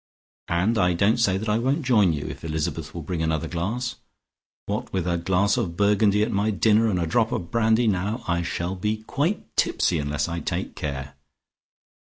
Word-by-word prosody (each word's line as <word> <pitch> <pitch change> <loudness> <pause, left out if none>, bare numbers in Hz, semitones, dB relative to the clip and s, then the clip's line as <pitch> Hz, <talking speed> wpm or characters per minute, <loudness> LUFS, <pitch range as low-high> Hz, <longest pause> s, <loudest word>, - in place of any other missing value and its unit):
And 95 +7 +1
I 90 -2 +3
don't 100 +7 +2
say 95 -5 +3
that 110 +3 -4
I 105 +1 +2
won't 135 +6 0
join 105 -8 +4
you, 75 -2 -3
if 65 +3 -7
Elizabeth 80 0 -3
will 85 - -5
bring 85 0 -3
another 80 0 0
glass. 110 +10 -3 0.7
What - - -3
with 95 -3 -1
a 85 -1 0
glass 95 +4 +2
of 85 -2 -2
Burgundy 105 0 +3
at 110 - -1
my 100 +2 +1
dinner, 110 +2 +3
and 90 -4 0
a 85 - 0
drop 115 +7 +1
of 90 -9 -3
brandy 115 +1 +3
now, 105 +3 0
I 85 -1 +1
shall 85 +1 -3
be 105 +3 -2
quite 160 - -2
tipsy - - +1
unless 75 0 -1
I 85 0 -3
take - - -3
care. 65 -2 -5
95 Hz, 195 wpm, -24 LUFS, 85-110 Hz, 0.7 s, join